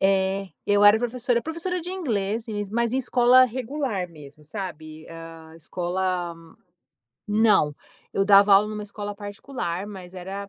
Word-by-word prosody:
É, 195 0 +1 0.2
eu 205 0 +4
era 205 +2 +8
professora 245 0 0
professora 340 +3 -3
de 355 +2 -7
inglês, 225 - -2 0.3
mas 235 +1 0
em - - +1
escola 250 0 +5
regular 250 -6 -3
mesmo, 150 -2 -14
sabe. 155 -3 -7
Hã, 165 -1 -11
escola 180 +1 -2 0.9
Não, 205 -8 +3 0.4
eu 195 - +1
dava 200 0 +6
aula 210 +2 +5
em - - -5
uma 210 - -5
escola 205 0 -6
particular, 205 -2 -5
mas 190 -3 -10
era, 195 +2 -6
200 Hz, 145 wpm, -24 LUFS, 180-235 Hz, 0.9 s, era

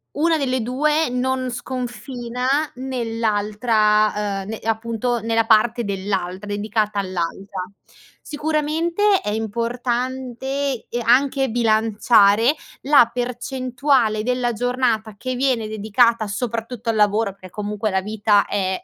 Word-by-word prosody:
1 325 +2 +2
delle 260 -2 0
2 300 +5 +1
non 255 0 -1
sconfina 245 0 -5 0.3
nell'altra, 215 -4 0
uhm, 195 - -10
ne 220 - -4
appunto, 230 +2 -1
nella 225 0 +1
parte 230 +2 +3
dell'altra, 195 -1 -3
dedicata 210 +1 -1
all'altra. 185 +1 -4 0.6
Sicuramente, 320 +6 +1
è - - -3
importante, 245 +4 -2
ehm, 240 - -2
anche 265 +2 +3
bilanciare 220 +1 +3 0.3
la 275 -4 +6
percentuale 250 -1 0
della 250 0 0
giornata 235 -2 -1
che 255 +2 -3
viene 250 -4 0
dedicata 220 +2 +2
soprattutto 230 +2 -4
al 225 - +1
lavoro, 210 0 +2
perché 185 -1 -13
comunque 210 +2 -3
la 190 -1 0
vita 205 0 +2
è 190 -2 -1
230 Hz, 110 wpm, -21 LUFS, 210-255 Hz, 0.6 s, la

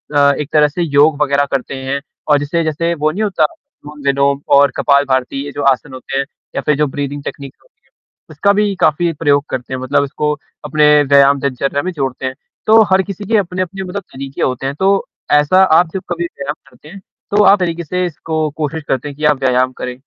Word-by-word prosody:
अ, 140 0 +5
एक 150 - -4
तरह 150 -1 +5
से 160 +5 -4
योग 145 -1 +3
वग़ैरह 140 -1 +2
करते 135 0 -2
हैं 135 +1 -2 0.3
और 145 -1 +4
जिसे 160 +4 -1
जैसे 165 +2 -1
वो 155 0 0
नहीं 205 +7 -2
होता 200 -3 0
अनुलोम-विलोम 140 - -2 0.2
और 140 -1 +5
कपाल 140 0 +3
भारती 130 +1 -1
ये 145 - -6
जो 145 - -4
आसन 135 +1 -4
होते 130 +1 -5
हैं, 140 - 0 0.3
या - - -1
फिर 150 - +1
जो 150 0 +2
ब्रीदिंग 145 +1 -5
टेक्नीक 140 -1 -7
होती - - -33
है, - - -34 0.4
उसका 200 0 +1
भी 205 -1 +1
काफ़ी 170 +3 +2
प्रयोग 145 -2 +1
करते 130 +1 -5
हैं 130 - -3
मतलब 130 +2 +1
उसको 150 +2 -2 0.3
अपने 150 0 +2 0.2
व्यायाम 140 0 +4
दिनचर्या 140 +1 -1
में 185 - -2
जोड़ते 135 -5 -4
हैं। 130 - -2 0.3
तो 220 +1 +7
हर 190 0 +5
किसी 200 +1 -7
के 220 +2 +2
अपने-अपने 185 0 -2
मतलब 190 +2 -5
तरीके 135 0 -7
होते 130 +1 -1
हैं, 140 - -2
तो 195 +4 +1 0.2
ऐसा 150 +6 +4
आप 175 -1 +4
जब 190 - -3
कभी 175 0 -2
व्यायाम 145 -3 -5
करते 125 +4 -17
हैं, 195 +4 -11 0.3
तो 210 +1 +4
आप 200 0 +6
तरीके 170 -1 -2
से 180 +3 -2
इसको 160 -2 -3
कोशिश 155 0 -3
करते 130 +2 -1
हैं 140 - -10
कि 150 - -2
आप 150 -2 +3
व्यायाम 130 -1 +2
करें? 125 -1 -4
150 Hz, 220 wpm, -16 LUFS, 140-175 Hz, 0.4 s, तो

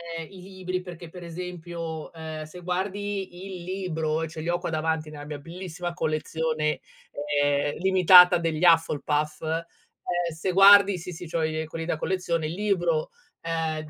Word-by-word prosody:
ehm, 165 -1 -5
i 190 -2 -12
libri 185 -1 -5
perché 175 -2 -9
per 180 0 -10
esempio, 170 -2 -6
ehm, 160 -1 -6
se 165 +4 -11
guardi 190 0 -3
il 175 - -9
libro, 165 -4 -2
ce 160 0 -8
li 165 - -3
ho 175 +1 +1
qua 175 - -4
davanti 160 -1 -1
nella 145 -1 -9
mia 150 -1 -6
bellissima 175 +2 -6
collezione, 155 -1 -1 0.6
ehm, 145 0 +1
limitata 180 -1 +7
degli 165 -1 -2
Hufflepuff, 155 -3 +2
ehm, 160 +1 -2 0.7
se 180 +3 -2
guardi 200 0 +7
sì, 180 +2 -7
sì, 175 +1 -8
c'ho 165 0 -1
i 155 0 -1
ehm, - - -4
quelli 165 +1 -6
da 160 - -1
collezione, 170 -3 -1
il 155 - -3
libro, 175 -5 0 0.3
ehm 160 -2 -2
165 Hz, 165 wpm, -26 LUFS, 155-180 Hz, 0.7 s, limitata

